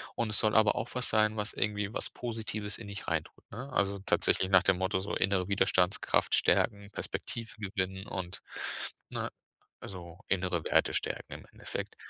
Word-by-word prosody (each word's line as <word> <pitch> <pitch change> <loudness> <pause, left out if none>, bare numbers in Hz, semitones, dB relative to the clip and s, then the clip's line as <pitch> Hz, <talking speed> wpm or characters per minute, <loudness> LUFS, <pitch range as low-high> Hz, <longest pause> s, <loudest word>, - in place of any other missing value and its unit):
Und 115 -2 0
es 105 - +5
soll 110 -1 +2
aber 110 -2 +5
auch 115 - -2
was 125 -1 +2
sein, 110 0 +3
was 105 0 -2
irgendwie 105 0 0
was - - +1
Positives 110 -4 -4
in 110 - -9
dich 100 0 -7
reintut, 80 -2 -3
ne? 130 +6 -7
Also, 100 0 +1
tatsächlich 95 - +3
nach 95 -2 +7
dem 95 -1 +3
Motto 95 +1 0
so 100 - -3
innere 95 -1 +2
Widerstandskraft 95 -1 +2
stärken, 100 -2 +2
Perspektive 115 +2 -5
gewinnen 95 -2 -3
und, 90 -2 -5 0.7
ne, - - -3 0.5
also, 90 -3 -8
innere 90 -3 0
Werte - - +3
stärken - - -2
im - - -11
Endeffekt. - - -5
100 Hz, 170 wpm, -31 LUFS, 95-110 Hz, 0.7 s, nach